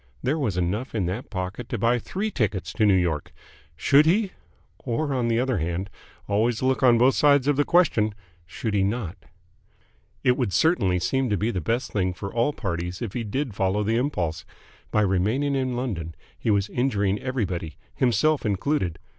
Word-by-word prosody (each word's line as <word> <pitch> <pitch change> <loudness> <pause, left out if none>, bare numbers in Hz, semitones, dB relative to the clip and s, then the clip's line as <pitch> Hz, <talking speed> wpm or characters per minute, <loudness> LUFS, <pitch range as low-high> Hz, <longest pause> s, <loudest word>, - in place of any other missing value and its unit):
There 140 +5 0
was 110 -11 -1
enough 100 +9 -2
in 100 -5 0
that 95 +8 -4
pocket 95 +4 -5
to 120 - -2
buy 115 +3 +2
three 205 - -3
tickets 105 - -1
to 110 -2 +2
New 100 - +5
York. 85 -5 0 0.4
Should 140 - +4
he?... 195 +3 +2 0.5
Or, 135 +4 -2
on 125 -3 0
the 115 0 +2
other 130 -5 0
hand 85 +4 -3 0.4
always 110 +4 +1
look 130 -2 +1
on 120 -2 +6
both 125 +3 +5
sides 145 -2 +4
of 145 - +3
the 145 - +3
question 120 - +2 0.3
should 110 +3 -4
he 100 -1 +2
not? 100 -3 -2 1.1
It 125 -1 +3
would 120 -8 -1
certainly 100 - +3
seem 125 +9 0
to 105 - +1
be 110 +5 0
the 90 - -2
best 115 +10 -1
thing 95 -3 0
for 100 +1 -6
all 120 +5 +2
parties 90 - -4
if 110 -4 -5
he 120 - -2
did 125 +3 -3
follow 95 +2 0
the 110 +2 +1
impulse. 90 - -1 0.5
By 105 - +2
remaining 105 +9 +1
in 130 -2 -1
London 90 -11 -4 0.2
he - - -3
was 100 -1 +2
injuring 105 -6 0
everybody, 95 - -3 0.2
himself 130 +5 +2
included. 100 - 0
110 Hz, 185 wpm, -25 LUFS, 95-130 Hz, 1.1 s, on